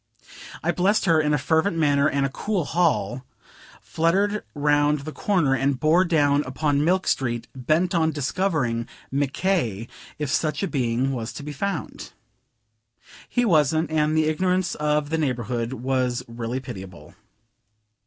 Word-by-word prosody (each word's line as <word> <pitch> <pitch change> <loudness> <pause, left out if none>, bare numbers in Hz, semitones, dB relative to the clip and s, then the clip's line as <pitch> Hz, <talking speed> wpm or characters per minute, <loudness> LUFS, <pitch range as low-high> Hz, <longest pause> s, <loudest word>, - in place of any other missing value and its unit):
I 170 - +2
blessed 190 +5 +1
her 165 -3 +4
in 150 -1 0
a 150 - +3
fervent 160 +6 +1
manner 145 -2 +3
and 140 -2 0
a - - -1
cool 190 +4 -2
hall, 130 - 0 0.6
fluttered 195 +6 0
round 145 0 +2
the 155 +3 -6
corner, 170 -7 +1
and 135 0 0
bore 165 +6 +4
down 145 -4 +3
upon 145 +2 0
Milk 185 +4 +2
Street, 120 -3 -1
bent 155 +8 +1
on 160 -2 +2
discovering 145 - -1 0.2
Mc 140 0 0
K. 125 - -1 0.3
if 150 -3 -3
such 155 +4 0
a - - +1
being 130 -2 0
was 120 -3 -4
to - - -8
be 150 +1 -6
found. 195 +3 -4 1.2
He 245 - +1
wasn't, 160 - +2
and 155 0 +1
the 155 - +3
ignorance 180 +3 0
of 150 0 0
the 160 - 0
neighborhood 120 -4 -2
was 130 -1 -1
really 115 +2 -4
pitiable. 95 - -10
150 Hz, 150 wpm, -24 LUFS, 130-165 Hz, 1.2 s, her